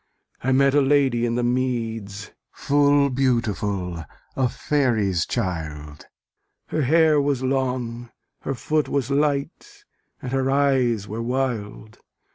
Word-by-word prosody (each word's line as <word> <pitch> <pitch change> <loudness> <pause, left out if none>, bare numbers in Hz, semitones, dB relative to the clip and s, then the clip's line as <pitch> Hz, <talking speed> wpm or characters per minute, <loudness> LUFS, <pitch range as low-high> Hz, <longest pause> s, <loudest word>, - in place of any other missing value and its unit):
I 130 - +1
met 135 +1 +4
a 145 - +4
lady 135 -4 +2
in 115 - -1
the 120 - 0
meads 115 -5 -2 0.2
Full 145 -1 +2
beautiful, 105 -9 -1 0.3
a 130 -2 +1
faery's 110 - 0
child; 75 -8 -4 0.6
Her 155 - -1
hair 155 +2 +4
was 140 -2 -1
long, 125 -3 -2 0.3
her 135 - -4
foot 150 +5 -1
was 140 -1 -1
light, 140 0 -2 0.3
And 125 - -6
her 135 0 0
eyes 130 -6 +1
were 110 +3 -5
wild. 115 -4 -3
125 Hz, 120 wpm, -23 LUFS, 110-140 Hz, 0.6 s, met